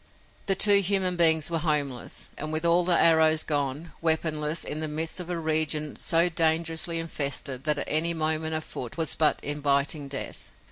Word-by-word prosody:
The 195 - +3
two 200 +1 +6
human 190 -1 +1
beings 160 -2 +3
were 165 - -1
homeless 145 -5 -2
and, 155 +1 -5
with 155 +1 -2
all 170 +1 +3
the 175 -1 +2
arrows 160 -1 +4
gone, 145 +2 -3
weaponless, 160 -1 -1
in 150 - -4
the 155 - -3
midst 160 +3 -4
of 180 -1 -8
a 175 - -3
region 155 -2 -1
so 165 +1 +2
dangerously 165 0 0
infested 140 -4 -4
that 150 -2 0
any 165 +3 +1
movement 160 0 -1
afoot 155 -3 -7
was 160 -2 +3
but 155 - +2
inviting 145 0 -1
death. 135 -1 -6
160 Hz, 170 wpm, -25 LUFS, 150-165 Hz, -, two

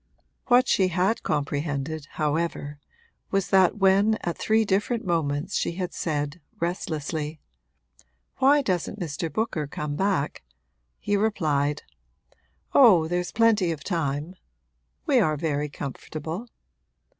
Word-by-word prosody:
What 250 +1 +5
she 190 - +3
had 185 +5 +1
comprehended, 145 +1 -2
however, 150 -1 -2 0.5
was 195 -1 0
that 190 0 +4
when 200 +2 +4
at 170 - -2
three 220 0 +2
different 210 +4 0
moments 150 -4 -1
she - - 0
had 180 0 -4
said, 150 0 -3 0.2
restlessly, 155 -3 -3 1.0
'Why 280 +2 +4
doesn't 190 0 -2
Mr. 165 -1 -3
Booker 170 -5 -2
come 150 0 -4
back?' 190 -5 0 0.6
he 205 - -1
replied, 150 -9 0 0.9
'Oh, 190 - +7
there's 175 +1 -2
plenty 220 -6 +3
of 155 -3 -5
time 155 -2 -2 0.7
we 280 -5 +4
are 155 -8 +2
very 150 -1 -1
comfortable.' 155 - -6
170 Hz, 115 wpm, -25 LUFS, 150-200 Hz, 1.0 s, Oh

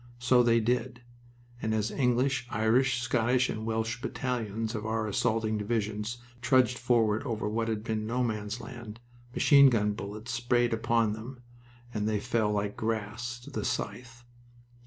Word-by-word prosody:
So 125 +1 +4
they 115 -1 +4
did; 120 +1 -1 0.6
and 110 0 0
as 110 0 0
English, 125 0 +1
Irish, 120 +3 +2
Scottish, 125 0 +2
and 110 +1 -5
Welsh 115 +2 -2
battalions 115 -5 -3
of 110 -2 -4
our 110 0 -1
assaulting 110 +1 0
divisions 105 +1 -2 0.2
trudged 125 -1 +3
forward 115 -3 +2
over 115 -6 -3
what 115 +2 -1
had 110 -2 -2
been 110 -1 -2
No 125 +2 0
Man's 105 -1 -3
Land, 120 -3 -9 0.4
machine 140 -2 +7
gun 105 -4 +1
bullets 105 +3 -6
sprayed 120 0 +1
upon 115 -1 +1
them, 125 +4 -9 0.5
and 105 0 -1
they 105 -1 0
fell 105 0 0
like 105 0 -1
grass 115 +2 -3
to - - -11
the - - -3
scythe. 120 -1 -4
115 Hz, 155 wpm, -29 LUFS, 110-120 Hz, 0.6 s, machine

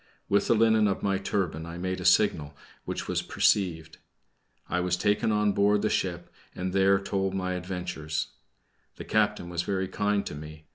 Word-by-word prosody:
With 100 - +2
the 115 - +4
linen 110 -1 +4
of 100 - -2
my 100 -1 +1
turban 90 -5 -2
I 85 0 -7
made 95 +1 -3
a - - -6
signal, 80 -6 +3 0.3
which - - -4
was - - 0
perceived. 80 -5 0 0.7
I 90 - -1
was 90 0 0
taken 105 +3 +1
on 105 -1 +2
board 100 +1 +2
the 110 - +1
ship 85 -2 -2 0.2
and 90 0 -3
there 95 0 +4
told 95 -1 -2
my 90 -1 -1
adventures. 90 -4 -4 0.7
The - - -8
captain 85 - +1
was 85 -1 -2
very 95 +1 -2
kind 105 +1 0
to - - -5
me. 75 +1 -10
95 Hz, 180 wpm, -27 LUFS, 85-100 Hz, 0.7 s, the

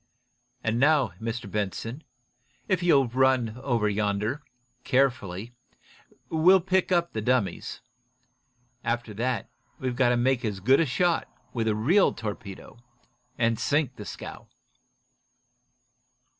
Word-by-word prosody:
And 115 +1 0
now, 145 -2 +4
Mr. 115 0 -4
Benson, 105 - -4 0.6
if 185 -3 +1
you'll 140 -7 +4
run 125 -2 +1
over 120 -6 +1
yonder, 105 +6 -1 0.4
carefully, 120 -5 0 0.7
we'll 175 +4 +5
pick 185 +1 0
up 170 -1 +1
the 110 - -2
dummies. 120 -3 -1 1.0
After 120 -2 -2
that, 120 +3 -2 0.3
we've 130 -2 -3
got 125 -1 +3
to 120 - +2
make 125 +1 +1
as 105 -4 -2
good 130 +8 +4
a 165 - +2
shot, 170 +6 +1 0.3
with 115 -2 -1
a 110 - +2
real 165 - +3
torpedo, 105 0 -7 0.6
and 115 -2 +1
sink 145 -3 +1
the 105 - -9
scow." - - -8
120 Hz, 120 wpm, -27 LUFS, 110-140 Hz, 1.0 s, we'll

